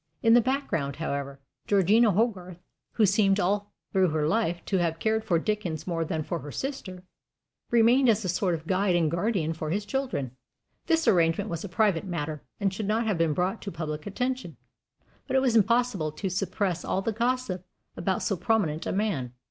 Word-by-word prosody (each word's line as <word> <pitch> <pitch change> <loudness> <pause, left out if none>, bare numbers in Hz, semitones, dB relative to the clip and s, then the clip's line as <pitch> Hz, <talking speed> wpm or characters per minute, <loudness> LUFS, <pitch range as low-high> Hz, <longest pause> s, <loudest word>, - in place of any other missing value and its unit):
In 225 -1 +6
the 240 - +7
background, 215 - -1
however, 140 -3 -4 0.3
Georgina 205 +4 +4
Hogarth, 190 -4 0 0.4
who 220 - +4
seemed 195 0 +3
all 205 +2 0 0.2
through 190 -2 +4
her 155 -1 0
life 175 -3 0
to 195 - 0
have 170 -2 0
cared 220 +4 0
for 175 - +2
Dickens 180 -3 -2
more 170 -2 -1
than 160 0 -2
for 170 +2 -3
her 145 -1 -8
sister, 195 - -5 0.7
remained 240 +3 +5
as 215 -2 +2
a - - 0
sort 180 0 +1
of 160 0 -9
guide 185 +1 +1
and 165 -3 +2
guardian 170 -3 0
for 155 -1 -5
his 200 +5 -1
children. 205 - -2 0.6
This 325 0 +2
arrangement 165 -4 +3
was 165 -1 -4
a 205 - -6
private 195 -2 +2
matter, 155 -4 -4 0.2
and 195 -2 0
should 195 +1 -4
not 220 +2 +1
have 205 -6 0
been 165 -2 +2
brought 185 +5 -1
to 200 - -5
public 155 -1 -5
attention; 250 +5 -3 0.7
but 265 - -1
it - - +6
was 245 -3 +2
impossible 220 -7 +2
to 190 +5 -3
suppress 185 -1 -1
all 190 - -1
gossip 230 -4 -1 0.3
about 185 +2 -1
so 205 - 0
prominent 180 -4 0
a - - -1
man. 180 - -1
190 Hz, 190 wpm, -27 LUFS, 165-220 Hz, 0.7 s, the